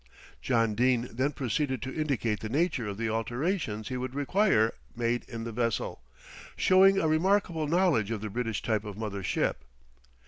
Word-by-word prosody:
John 115 -3 +2
Dene 125 +1 +2
then 130 +5 0
proceeded 135 -1 -1
to 130 - -5
indicate 135 -8 -1
the 110 - -5
nature 140 -4 0
of 100 -1 -5
the 115 0 -1
alterations 115 - -2
he 125 - -3
would 130 +1 -4
require 145 - +2 0.2
made 120 0 0
in 115 -2 -5
the 115 - -5
vessel, 115 0 -2 0.5
showing 190 +1 +5
a 165 - +2
remarkable 165 -1 +2
knowledge 165 - +2
of 110 -3 -3
the 105 -1 -5
British 115 -1 -2
type 110 -3 0
of 105 -2 -7
mother 105 -3 -4
ship. - - -1
125 Hz, 170 wpm, -29 LUFS, 110-155 Hz, 0.5 s, showing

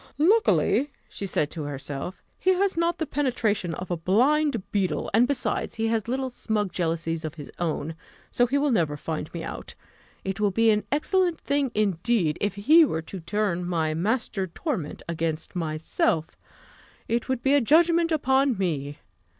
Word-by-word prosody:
"Luckily," 330 -4 +3 0.2
said 195 - -5
she 150 - +1
to 160 - -4
herself, 145 +4 -5 0.2
"he 375 - +3
has 390 0 +1
not 335 +1 +1
the 320 - -1
penetration 230 - 0
of 185 +2 -6
a 175 - 0
blind 245 - +2
beetle; 185 -7 -1
and, 235 +4 +5
besides, 285 -1 -1
he 225 0 0
has 225 -2 0
little 260 +1 -2
snug 210 -5 -2
jealousies 165 -1 -2
of 155 +1 -5
his 145 -4 -9
own: 160 -2 -2 0.4
so 245 - +3
he 275 +4 +1
will 285 0 +2
never 160 -9 +1
find 155 +1 -4
me 170 -1 -5
out. - - -7 0.5
It 195 +2 -3
would 205 -3 +1
be 225 -1 +5
an 210 0 0
excellent 350 +3 +1
thing 280 -1 0
indeed, 195 -4 +1
if 205 -2 0
he 300 +12 +6
were 160 - -1
to 185 +4 -8
turn 180 0 -1
my 165 -3 0
'master 195 +2 -1
torment' 180 - -4
against 165 -1 -3
myself 160 -1 0 0.8
it 235 +2 -1
would 260 -2 -1
be 275 - +3
a 285 - +5
judgment 335 +5 +4
upon 270 -4 +2
me. 145 -6 -2
210 Hz, 170 wpm, -26 LUFS, 165-270 Hz, 0.8 s, he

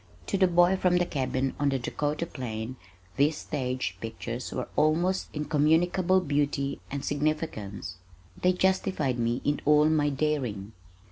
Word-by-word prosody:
To - - -2
the 190 -1 +4
boy 175 +2 +4
from 180 -1 +3
the 175 - +2
cabin 130 -3 -1
on 145 -1 +2
the 135 - +1
Dakota 150 +5 -2
plain 120 -5 -5 0.4
these 145 +3 +3
stage 130 -3 -3
pictures 115 +2 -5
were 125 - -2
of - - -11
almost 175 +5 +2
incommunicable 165 +5 +2
beauty 145 -3 -1
and 140 0 -4
significance. 145 - -2 0.4
They 180 0 +4
justified 185 -8 +1
me 120 +1 0
in 145 0 +1
all 150 +1 +5
my 150 -2 +2
daring. 135 -9 -2
145 Hz, 145 wpm, -28 LUFS, 130-170 Hz, 0.4 s, all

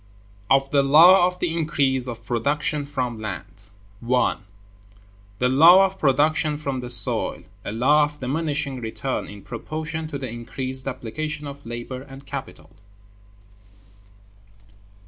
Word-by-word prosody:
Of 135 0 +2
The 140 - +4
Law 170 +6 +6
Of 180 0 -5
The 165 -2 -2
Increase 135 -5 +1
Of 115 -2 -8
Production 145 +6 -1
From 125 -5 -4
Land. 100 -6 -7
§ 100 - -17 0.4
1. 125 -4 0 0.9
The 125 - +1
Law 165 +9 +7
of 195 0 -5
Production 150 +2 +1
from 140 -3 -4
the 125 -1 -7
Soil, 120 -1 +4 0.2
a - - -5
Law 145 +7 +3
of 150 0 -10
Diminishing 140 -1 -2
Return 120 +4 -4
in 105 -1 -12
Proportion 155 +6 -5
to 150 -2 -5
the 135 -1 -6
Increased 130 +3 -3
Application 150 +4 -5
of 140 -2 -10
Labor 120 +2 -6
and 135 0 -13
Capital. - - -8
135 Hz, 135 wpm, -22 LUFS, 125-150 Hz, 0.9 s, Law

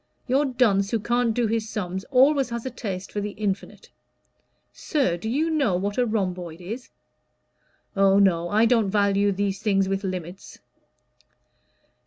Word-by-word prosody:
Your 270 +3 +2
dunce 225 -7 +2
who 230 - 0
can't 240 +2 +1
do 235 +1 0
his 220 0 -1
sums 190 -2 -4
always 275 0 +3
has 235 0 -5
a 260 - -3
taste 195 -5 -6
for 205 - -3
the 205 0 -4
infinite. 200 -2 -4 0.8
Sir, 270 - 0
do 195 +6 -5
you 310 +7 0
know 275 - +1
what 200 +5 -2
a 245 - +2
rhomboid 180 -6 -3
is? 220 +8 -7 1.1
Oh, 195 0 +4
no, 175 -4 +3
I 215 +4 +3
don't 225 -4 +3
value 200 0 +2
these 200 0 -2
things 195 -3 +2
with 195 +1 -2
limits. 185 -1 -6
205 Hz, 155 wpm, -24 LUFS, 195-240 Hz, 1.1 s, Oh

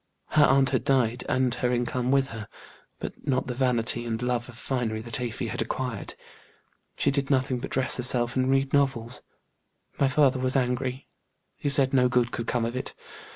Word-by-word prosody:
Her 150 - +5
aunt 135 0 +4
had 130 -4 +1
died 125 -2 +2
and 130 -2 +2
her 125 +1 0
income 125 +1 -1
with 135 0 +3
her, 110 -2 -7 0.5
but - - -8
not 130 -2 +1
the 125 - -3
vanity 120 -2 0
and 115 -1 -3
love 125 0 -1
of 120 - -12
finery 120 -4 -2
that 115 +1 -4
Afy 120 0 -3
had 115 - -3
acquired. 125 +1 -4 0.8
She - - +2
did 140 0 -1
nothing 130 -2 +1
but - - -6
dress 130 -1 +1
herself 120 -1 +1
and 130 0 +1
read 135 0 +1
novels. 130 -4 +1 0.8
My 140 - +4
father 135 -1 +3
was 130 +1 +1
angry; 130 0 -1 0.5
he 145 - -2
said 140 -1 +3
no 125 -2 +4
good 120 -1 +2
could 115 - -4
come 120 -2 0
of 120 +2 -3
it. 130 - -4
125 Hz, 190 wpm, -26 LUFS, 120-135 Hz, 0.8 s, Her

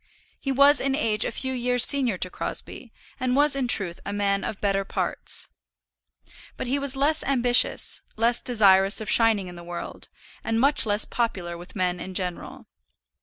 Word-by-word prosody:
He 275 - -3
was 280 +2 +4
in 270 0 -1
age 220 -7 0
a - - -3
few 260 +3 -5
years 245 -1 +3
senior 260 -8 +4
to 185 0 -2
Crosbie, - - -7 0.3
and 255 0 -1
was 290 0 +3
in 270 -2 -2
truth 190 -7 -2
a 200 - -6
man 200 -1 -1
of 210 - -6
better 195 -1 -1
parts. - - -4 1.1
But - - -5
he 265 +3 -1
was 280 -1 0
less 295 +4 +1
ambitious, 245 -3 +3
less 230 +2 +1
desirous 200 -4 +4
of 220 - -3
shining 220 -5 +2
in 175 -1 -10
the 170 - -11
world, 175 0 -8 0.3
and 225 0 -2
much 280 -2 +3
less 205 +1 0
popular 190 -8 -4
with 175 +4 -13
men 180 -2 -2
in 185 +1 -8
general. 180 -2 -5
225 Hz, 175 wpm, -24 LUFS, 195-260 Hz, 1.1 s, was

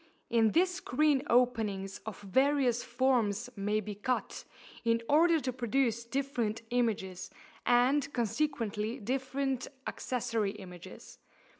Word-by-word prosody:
In 225 -2 +4
this 360 +2 +3
screen 295 -4 +2
openings 220 -6 +1
of 220 - -6
various 260 +3 +2
forms 245 -3 +1
may 205 +1 0
be 210 0 -5
cut, 250 +5 -3 0.4
in 230 -1 +1
order 325 +2 +5
to 260 -3 -3
produce 235 -1 0
different 235 -4 -2
images, 200 -6 -1 0.4
and 260 +4 +3
consequently 230 -3 -1
different 265 +2 -2 0.2
accessory 225 -5 -2
images. 180 -4 -11
240 Hz, 110 wpm, -31 LUFS, 210-270 Hz, 0.4 s, order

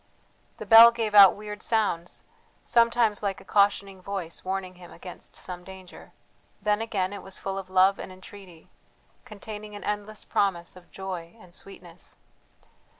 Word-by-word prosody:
The - - -8
bell 225 +1 +10
gave 225 -2 -3
out 200 -2 +9
weird 210 0 -8
sounds, 205 -7 -1 0.4
sometimes 230 -3 +2
like 200 -2 -2
a - - -16
cautioning 200 -2 +1
voice 185 -3 -5
warning 190 -1 -4
him 180 -1 -14
against 175 +1 -10
some 180 -1 -5
danger 190 -1 -13 0.5
then 210 +1 0
again 200 -4 -2
it 200 - -7
was 190 -1 -6
full 195 0 -5
of 190 -1 -10
love 190 +1 +4
and - - -7
entreaty, 185 -2 -14 0.5
containing 210 -2 -9
an 205 - -9
endless 210 +1 -4
promise 175 -4 -1
of 180 -1 -16
joy 185 -2 -7
and 180 -4 -17
sweetness. 175 -3 -10
195 Hz, 150 wpm, -26 LUFS, 185-210 Hz, 0.5 s, bell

